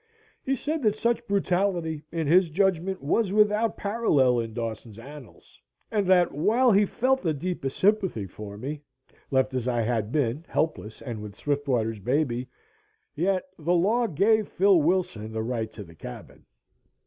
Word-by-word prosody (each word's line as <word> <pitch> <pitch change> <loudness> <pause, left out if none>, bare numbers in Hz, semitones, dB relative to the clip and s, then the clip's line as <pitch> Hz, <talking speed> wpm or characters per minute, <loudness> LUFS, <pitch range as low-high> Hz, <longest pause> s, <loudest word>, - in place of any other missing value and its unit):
He 270 - 0
said 305 +4 -3
that 215 -4 +2
such 235 +1 -1
brutality, 180 -5 0
in 165 -1 -2
his 175 +3 +4
judgment, 190 0 0
was 190 +7 +1
without 210 +1 +2
parallel 150 - +2
in 115 -1 -3
Dawson's 110 -1 -6
annals 135 0 -13 0.3
and 205 -3 0
that, 180 -2 +4
while 230 - +3
he 205 0 +4
felt 265 +5 +1
the 160 -3 0
deepest 145 -4 -4
sympathy 190 - +1
for 100 +2 -9
me, 140 +6 -5 0.5
left 130 -1 +1
as 130 -1 -2
I 120 -2 +1
had 110 -2 -1
been 140 +1 0
helpless 115 -9 -2
and 115 -5 -5
with 105 -1 -8
Swiftwater's 125 -6 -1
baby, 125 +2 -1 0.6
yet 185 +1 0 0.2
the 170 +3 +1
law 220 +7 +2
gave 210 +5 +2
Phil 190 -2 +4
Wilson 150 - -1
the 110 0 -2
right 115 -1 -3
to 105 - -9
the 85 -3 -15
cabin. 70 -5 -11
155 Hz, 160 wpm, -26 LUFS, 120-200 Hz, 0.6 s, his